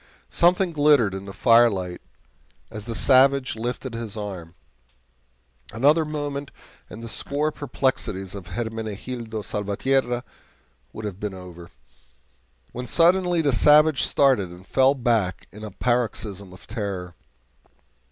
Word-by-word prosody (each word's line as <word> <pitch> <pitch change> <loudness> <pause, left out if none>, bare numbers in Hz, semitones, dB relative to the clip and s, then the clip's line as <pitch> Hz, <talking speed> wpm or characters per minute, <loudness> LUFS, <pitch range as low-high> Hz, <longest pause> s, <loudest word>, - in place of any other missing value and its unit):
Something 180 +1 +3
glittered 145 - +3
in 95 0 -6
the 100 - -8
firelight 105 -6 +3 0.7
as 105 -2 -8
the 115 -1 -5
savage 135 0 +4
lifted 120 +2 -4
his 115 -2 -6
arm; 95 -5 -7 1.2
another 145 +8 +3
moment 145 -2 -4 0.4
and 110 +2 -10
the - - -6
sore 145 +6 -1
perplexities 120 -9 -2
of 95 -4 -9
Hermenegildo 110 0 -5
Salvatierra 120 +5 -1 0.7
would 110 - -8
have 100 -2 -6
been 105 -2 -4
over, 90 -2 -11 1.0
when 125 +1 -6
suddenly 175 +1 +3
the 140 -3 +2
savage 150 +3 +5
started 130 -10 +2
and 90 +2 -13
fell 135 +7 +3
back 115 -7 0
in 105 +2 -11
a 110 - -5
paroxysm 105 -4 -2
of 90 - -14
terror. 100 -5 -5
115 Hz, 125 wpm, -24 LUFS, 100-140 Hz, 1.2 s, savage